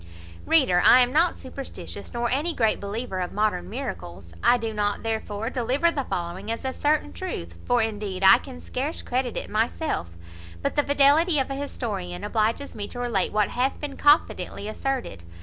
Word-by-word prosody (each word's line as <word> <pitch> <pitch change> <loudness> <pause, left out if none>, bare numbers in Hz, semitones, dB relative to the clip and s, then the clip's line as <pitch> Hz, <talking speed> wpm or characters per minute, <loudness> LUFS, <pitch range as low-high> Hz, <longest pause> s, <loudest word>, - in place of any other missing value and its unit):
Reader, 260 - +4
I 255 - +8
am 250 +1 +2
not 335 +3 +3
superstitious, 270 +1 -8
nor 240 0 -1
any 305 +6 0
great 225 -3 +2
believer 200 -1 -4
of 180 -1 -3
modern 210 -4 0
miracles. 95 - -6
I 245 - +5
do 225 -2 -3
not, 205 -1 -1
therefore, 220 0 -3
deliver 265 +7 +1
the 280 -5 -2
following 175 +4 -4
as 230 +3 -3
a 260 - -1
certain 290 - 0
truth; 85 0 -5
for, 245 -2 +3
indeed, 205 -3 -3
I 195 - +9
can 255 -2 -10
scarce 280 +6 -4
credit 250 -1 -1
it - - -4
myself: 225 - -1 0.5
but - - 0
the 290 - +3
fidelity 290 +4 +4
of 270 0 0
an 270 - -3
historian 195 -10 -4
obliges 220 +6 -1
me 205 -1 -3
to - - -10
relate 235 -6 0
what 210 -2 +2
hath 255 +2 -1
been 290 -2 -5
confidently 290 -7 +2
asserted. 255 - -3
235 Hz, 180 wpm, -25 LUFS, 205-275 Hz, 0.5 s, I